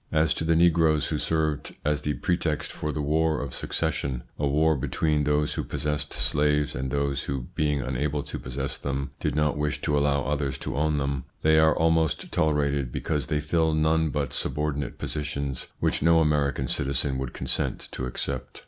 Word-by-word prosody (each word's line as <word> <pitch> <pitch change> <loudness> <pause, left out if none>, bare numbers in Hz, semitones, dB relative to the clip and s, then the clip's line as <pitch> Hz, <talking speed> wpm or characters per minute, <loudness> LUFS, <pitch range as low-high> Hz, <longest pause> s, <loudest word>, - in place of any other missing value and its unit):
As 80 0 +3
to - - -3
the 80 0 +3
negroes 80 -2 +4
who 75 - -1
served 80 -3 -1
as 75 -1 +1
the 75 -1 -1
pretext 85 -4 -1
for 75 - -3
the 75 -1 -3
War 80 +2 +2
of 70 -3 -5
Succession 65 -3 -1 0.2
a 75 - +1
war 80 +3 +3
between 75 +2 0
those 75 0 +1
who - - -2
possessed 75 -1 -2
slaves, 75 0 +1
and 65 +2 -3
those 70 +1 -1
who, 65 -3 -4
being 75 -2 +1
unable 70 +3 -1
to - - -5
possess 65 +2 -4
them, 70 -1 -3
did 75 -2 -1
not 75 -1 +1
wish 75 0 -1
to 75 - +1
allow 70 -1 +2
others 70 -1 -1
to 65 - -4
own 75 +1 +1
them 70 -2 -2 0.2
they 80 0 +5
are 80 0 +4
almost 80 -1 +1
tolerated 70 -4 +1
because 75 +1 -2
they 75 - 0
fill 80 +1 +1
none 80 +1 +2
but 70 -3 -2
subordinate 75 -1 -2
positions 70 -2 -3
which - - +1
no 85 +1 +5
American 75 -3 +1
citizen 65 +1 0
would 65 -2 -3
consent - - -1
to 65 - -4
accept. 65 +1 -4
75 Hz, 185 wpm, -26 LUFS, 70-80 Hz, 0.2 s, they